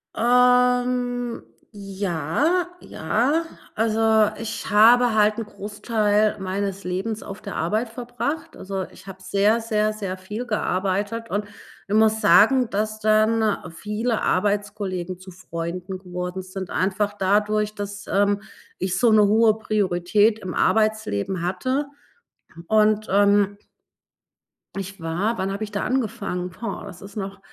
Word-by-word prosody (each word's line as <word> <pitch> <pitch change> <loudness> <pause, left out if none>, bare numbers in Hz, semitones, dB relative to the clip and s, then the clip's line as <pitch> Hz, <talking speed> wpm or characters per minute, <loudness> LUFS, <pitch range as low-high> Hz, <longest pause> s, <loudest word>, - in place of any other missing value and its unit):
Ähm, 250 0 +2 0.3
ja, 200 - -1
ja. 255 - 0 0.3
Also, 220 -1 +3
ich 225 0 -5
habe 230 +3 +6
halt 210 0 +3
'n 225 - -3
Großteil 210 0 0
meines 195 +1 -3
Lebens 195 +5 -3
auf 200 +2 -9
der 200 -2 -7
Arbeit 215 +8 -1
verbracht. 245 +6 -4
Also, 190 0 -4
ich - - -16
habe 190 -1 -10
sehr, 200 +4 +2
sehr, 215 -1 0
sehr 195 -3 -5
viel 210 +6 -6
gearbeitet 205 +2 -1
und 205 +2 -1 0.4
ich 205 - 0
muss 220 0 +4
sagen, 225 +4 +5
dass 215 +2 -2
dann 215 0 +3 0.2
viele 215 +5 -2
Arbeitskollegen 200 -2 -1
zu 185 0 -11
Freunden 180 +1 -6
geworden 180 0 -5
sind, 185 0 -7
einfach 200 +2 0
dadurch, 210 +2 +1
dass, 205 0 -6
ähm, 200 +1 +2 0.4
ich 185 0 -1
so 230 +2 +4
'ne 215 -1 +6
hohe 220 +1 +4
Priorität 210 +1 +1
im 185 -3 -6
Arbeitsleben 215 - +1
hatte. 255 +11 -1 0.8
Und, 215 0 +3
ähm 205 0 +3 1.2
ich 195 0 -6
war 180 +8 -1
wann 190 +1 -2
habe 200 +2 -3
ich 210 - -6
da 200 - -2
angefangen? 205 -8 -2
Boah, 225 +5 -6
das 180 -3 -11
ist 200 +1 -11
noch 195 -1 -5
210 Hz, 130 wpm, -23 LUFS, 190-220 Hz, 1.2 s, habe